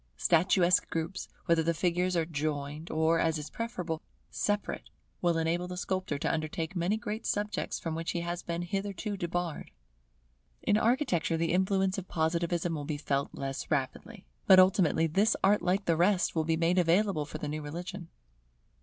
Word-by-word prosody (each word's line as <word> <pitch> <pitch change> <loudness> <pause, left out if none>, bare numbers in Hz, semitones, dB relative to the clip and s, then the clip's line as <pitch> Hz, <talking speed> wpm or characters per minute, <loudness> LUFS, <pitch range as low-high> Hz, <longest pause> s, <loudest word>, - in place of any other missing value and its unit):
Statuesque 175 +1 +3
groups, 165 +3 -3 0.2
whether 170 -1 +3
the 165 +1 0
figures 180 +2 +1
are 165 - +1
joined 150 0 -3
or, 160 +1 +2
as 160 -1 +1
is 150 0 -7
preferable, 180 -9 -4 0.3
separate, 205 0 -2 0.3
will 170 -2 +2
enable 165 +2 0
the 180 0 -6
sculptor 185 -5 -2
to - - -1
undertake 160 +2 -3
many 180 +5 +1
great 215 +1 -4
subjects 210 +1 -2
from 165 - -3
which 165 +1 -3
he 170 - -1
has 175 +1 -3
been 170 0 -3
hitherto 200 +3 -3
debarred. 175 -2 -3 0.9
In 205 - +3
Architecture 220 - +1
the 165 0 0
influence 190 +1 +1
of 190 - -9
Positivism 170 +1 0
will 150 -2 -3
be 150 0 -3
felt 140 -1 -2
less 135 -1 -4
rapidly; 155 - -3 0.2
but 190 -1 +9
ultimately 180 -4 +4
this 195 +7 +2
art 205 +2 +4
like 185 +3 0
the 165 - +3
rest 185 +3 +2
will 160 -2 0
be 160 0 +1
made 170 +3 +2
available 180 -1 +2
for 155 - -7
the 150 - -5
new 155 +1 -3
religion. 175 +4 -6
170 Hz, 170 wpm, -30 LUFS, 160-190 Hz, 0.9 s, but